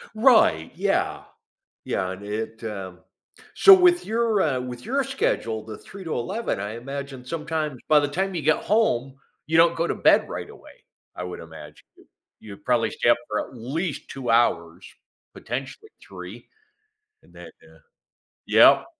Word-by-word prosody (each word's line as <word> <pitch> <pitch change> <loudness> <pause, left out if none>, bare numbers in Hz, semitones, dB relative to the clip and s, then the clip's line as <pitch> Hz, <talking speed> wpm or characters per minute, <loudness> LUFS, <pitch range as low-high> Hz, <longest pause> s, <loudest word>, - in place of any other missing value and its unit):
Right, 215 - +4
yeah. - - -1 0.6
Yeah, 95 -1 -2
and 95 +2 -9
it, 110 +2 -5
um, 95 -4 -6 0.6
so 400 - +9
with 355 -1 +5
your, 225 -2 +1
uh, 135 -5 +1
with 125 -1 -8
your 275 +2 0
schedule, 115 - -2
the 110 -2 -8
3 195 -1 -12
to 160 - -4
11, 190 - -3
I 105 +3 -5
imagine 135 0 -7
sometimes 155 -3 -3
by 150 -1 +6
the 145 - 0
time 190 +5 -2
you 165 - -2
get 155 +1 +3
home, 140 - 0 0.3
you 160 +1 +2
don't 170 0 +5
go 170 +1 0
to - - -2
bed - - +4
right - - -6
away. - - -16 0.3
I 90 - -5
would 90 - -7
imagine. 80 -1 -12 0.5
You 100 -2 -11
probably 120 -2 0
stay 120 - 0
up 120 - +5
for 105 - -1
at - - -15
least 145 +8 -4
2 130 -3 -6
hours, 85 -8 +1 0.5
potentially 135 - -7 0.2
3, - - -10 0.8
and - - -23
then, - - -11 0.2
uh, - - -20 0.7
yup. - - +6
135 Hz, 160 wpm, -24 LUFS, 110-175 Hz, 0.8 s, so